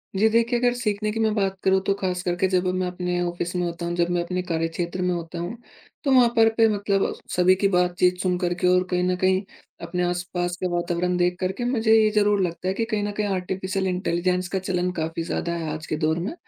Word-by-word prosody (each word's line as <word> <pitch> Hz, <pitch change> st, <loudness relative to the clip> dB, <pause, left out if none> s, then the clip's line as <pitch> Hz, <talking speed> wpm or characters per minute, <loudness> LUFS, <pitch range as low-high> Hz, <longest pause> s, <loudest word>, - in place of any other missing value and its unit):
जी, 210 Hz, +3 st, +4 dB
देखिए, 230 Hz, +2 st, +2 dB
अगर 245 Hz, 0 st, +2 dB
सीखने 215 Hz, -3 st, -1 dB
की 225 Hz, -, -4 dB
मैं 220 Hz, -1 st, +2 dB
बात 195 Hz, -2 st, 0 dB
करूँ, 190 Hz, 0 st, +4 dB
तो 200 Hz, -, +4 dB
खासकर 180 Hz, -1 st, -1 dB
के 190 Hz, +1 st, +1 dB
जब 185 Hz, -1 st, +1 dB
मैं 185 Hz, 0 st, 0 dB
अपने 180 Hz, 0 st, -2 dB
ऑफ़िस 175 Hz, 0 st, -3 dB
में 180 Hz, -, 0 dB
होता 170 Hz, 0 st, -4 dB
हूँ, 170 Hz, -, -2 dB
जब 170 Hz, 0 st, +1 dB
मैं 175 Hz, -1 st, +1 dB
अपने 180 Hz, +1 st, -2 dB
कार्यक्षेत्र 170 Hz, +1 st, -2 dB
में 180 Hz, 0 st, +1 dB
होता 170 Hz, 0 st, -5 dB
हूँ, 175 Hz, +7 st, -5 dB, 0.5 s
तो 275 Hz, -, +1 dB
वहाँ 250 Hz, -2 st, +6 dB
पर 225 Hz, -1 st, +6 dB
पे 225 Hz, -1 st, +6 dB
मतलब 200 Hz, -1 st, 0 dB, 0.2 s
सभी 180 Hz, +1 st, +5 dB
की 195 Hz, +1 st, +2 dB
बातचीत 180 Hz, -1 st, +2 dB
सुन 180 Hz, -1 st, +1 dB
कर 175 Hz, -1 st, 0 dB
के 180 Hz, -, +3 dB
और 180 Hz, 0 st, +4 dB
कहीं 180 Hz, 0 st, +1 dB
न 180 Hz, 0 st, +1 dB
कहीं 185 Hz, 0 st, +3 dB, 0.4 s
अपने 180 Hz, +1 st, -2 dB
आस-पास 175 Hz, 0 st, -2 dB
के 185 Hz, -, -1 dB
वातावरण 175 Hz, +1 st, 0 dB
देख 180 Hz, 0 st, +1 dB
कर 185 Hz, 0 st, 0 dB
के, 240 Hz, +5 st, -4 dB
मुझे 225 Hz, -3 st, +2 dB
ये 220 Hz, -1 st, +5 dB
ज़रूर 205 Hz, -1 st, +3 dB
लगता 180 Hz, 0 st, -2 dB
है 190 Hz, -, +1 dB
कि 225 Hz, +3 st, -1 dB
कहीं 215 Hz, -2 st, -1 dB
न 205 Hz, -, -2 dB
कहीं 210 Hz, -, 0 dB
आर्टिफिशियल 190 Hz, +1 st, -2 dB
इंटेलिजेंस 180 Hz, 0 st, 0 dB
का -, -, +1 dB
चलन 180 Hz, -1 st, -1 dB
काफ़ी 165 Hz, +1 st, -2 dB
ज़्यादा 170 Hz, 0 st, -2 dB
है 165 Hz, -2 st, -3 dB
आज 155 Hz, 0 st, -6 dB
के -, -, -1 dB
दौर 160 Hz, +1 st, 0 dB
में। 185 Hz, -, -3 dB
180 Hz, 245 wpm, -24 LUFS, 175-200 Hz, 0.5 s, वहाँ